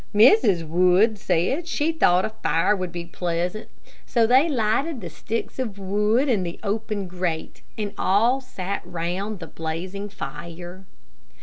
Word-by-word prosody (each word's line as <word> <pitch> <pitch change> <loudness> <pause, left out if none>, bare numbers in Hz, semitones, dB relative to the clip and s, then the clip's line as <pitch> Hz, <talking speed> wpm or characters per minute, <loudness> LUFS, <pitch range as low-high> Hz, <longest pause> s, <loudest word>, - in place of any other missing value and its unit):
Mrs. 205 - +5
Wood 180 +6 +4
said 180 - +1
that 345 - -10
she 320 -1 0
thought 185 - +3
a - - -2
fire 185 -1 +1
would 185 -2 -4
be 170 0 -5
pleasant; 175 +4 -3 0.3
so 235 -3 +2
they 260 +8 +5
lighted 260 +4 0
the 175 -6 -7
sticks 230 - -4
of 220 -6 -3
wood 210 +7 +1
in 230 -7 +2
the 170 -1 -5
open 210 -1 -2
grate, 175 -3 -3 0.2
and 205 -2 -3
all 230 +8 +3
sat 200 -6 -4
round 180 +4 -3
the 170 - -8
blazing 180 +6 -5
fire. 175 +3 -8
195 Hz, 150 wpm, -24 LUFS, 175-225 Hz, 0.3 s, Mrs